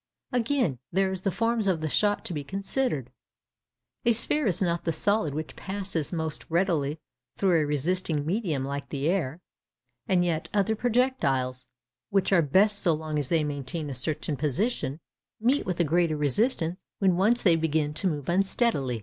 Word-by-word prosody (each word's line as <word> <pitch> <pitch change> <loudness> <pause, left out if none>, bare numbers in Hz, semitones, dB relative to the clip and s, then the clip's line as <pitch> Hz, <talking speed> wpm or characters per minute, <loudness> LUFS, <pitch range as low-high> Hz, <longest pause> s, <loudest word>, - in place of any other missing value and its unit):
Again, 245 - +1
there 190 +1 +2
is 190 -1 -4
the 195 - +1
form 230 +4 0
of 180 -4 +2
the 155 - -2
shot 205 +6 +1
to - - -4
be 145 -2 -3
considered. 195 - -2 0.9
A 235 -2 +4
sphere 285 +4 +1
is 180 - +1
not 170 -3 0
the 165 - 0
solid 165 -2 +1
which 155 0 -5
passes 190 -5 -3
most 160 -3 -3
readily 165 -4 +1 0.4
through 180 -5 +3
a - - +1
resisting 150 +1 0
medium 165 - -1
like 140 +1 -4
the 140 0 -2
air; 165 -3 -1 0.7
and 180 -4 +3
yet, 165 -2 -1
other 210 +2 +2
projectiles, 210 - 0 0.4
which 195 0 +2
are 175 - +6
best 200 +8 +3
so 170 -4 +4
long 155 -1 -3
as 140 - -3
they 165 -2 +2
maintain 145 +1 -4
a - - -3
certain 145 +3 -2
position, 150 - -1 0.4
meet 250 +6 +2
with 180 -2 -2
a - - +5
greater 165 0 +2
resistance 165 - +1 0.2
when 190 -3 +3
once 215 +7 +2
they 175 -4 +5
begin 155 -2 0
to 190 +5 -1
move 150 -6 -2
unsteadily. 180 - +1
170 Hz, 175 wpm, -27 LUFS, 150-200 Hz, 0.9 s, are